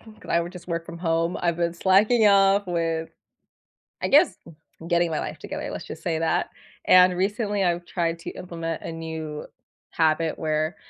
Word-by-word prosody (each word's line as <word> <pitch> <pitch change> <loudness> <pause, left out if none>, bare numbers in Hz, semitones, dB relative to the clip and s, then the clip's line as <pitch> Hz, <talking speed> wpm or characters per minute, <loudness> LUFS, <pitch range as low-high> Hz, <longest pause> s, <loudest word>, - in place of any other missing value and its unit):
'cause 220 -1 -14
I 170 - +3
would 170 +1 -5
just 180 -2 -11
work 165 -1 -3
from 170 0 -8
home. 165 0 0
I've 170 -1 0
been 170 -1 -1
slacking 210 +6 +4
off 200 0 +4
with, 165 -2 -2 0.9
I - - 0
guess, 305 +5 +5
g 165 - -12 0.4
getting 170 -1 +2
my 155 - -1
life - - -5
together. - - -6
Let's - - -6
just 160 - -9
say 165 -1 -1
that, 165 - 0 0.4
and 180 0 +6
recently, 205 +2 -1
I've 175 -1 0
tried 170 -1 -2
to - - -7
implement 165 -3 -5
a - - -6
new 160 -2 -6 0.5
habit 160 0 +1
where 155 +1 -1
170 Hz, 180 wpm, -24 LUFS, 165-185 Hz, 0.9 s, and